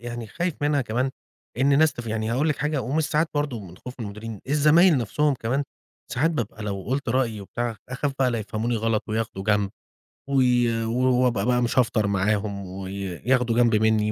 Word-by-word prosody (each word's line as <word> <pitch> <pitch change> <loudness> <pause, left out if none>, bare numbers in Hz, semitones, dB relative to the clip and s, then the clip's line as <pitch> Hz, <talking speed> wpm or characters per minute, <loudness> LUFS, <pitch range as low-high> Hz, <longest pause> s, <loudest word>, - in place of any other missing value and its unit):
يعني 120 -1 -6
خايف 170 +7 -2
منها 145 -1 +2
كمان، 125 +2 -1 0.5
إن 140 +2 +4
ناس 155 -3 +4
تف 120 -2 -8
يعني 110 0 -2
هاقول 140 +6 +1
لِك 150 - 0
حاجة، 150 -2 -1
ومش 150 +5 0
ساعات 155 +2 +1
برضه 145 -6 -1
من 90 -3 -11
خوف 125 +5 -9
المديرين، 105 0 -6
الزمايل 150 +4 +5
نفْسهُم 145 +6 +1
كمان 125 +3 -1 0.5
ساعات 150 +7 +2
بابقى 115 -7 -4
لو 100 -2 -3
قُلت 130 +5 -2
رأيي 115 -3 0
وبتاع، 115 +3 -4
أخاف 135 +3 -2
بقى 130 -2 +3
ليفهموني 115 +1 -2
غلط 110 -1 0
وياخدوا 110 -3 -3
جنب 105 -2 +2 0.6
و - - -2 0.9
و - - +5
ابقى 110 -4 0
بقى 125 0 +2
مش 120 +1 +1
هافطر 110 -4 +2
معاهُم، 100 0 0
وي 95 +1 -6
ياخدوا 115 +6 0
جنب 120 -1 +4
مني 110 0 +2
120 Hz, 185 wpm, -24 LUFS, 105-135 Hz, 0.9 s, الزمايل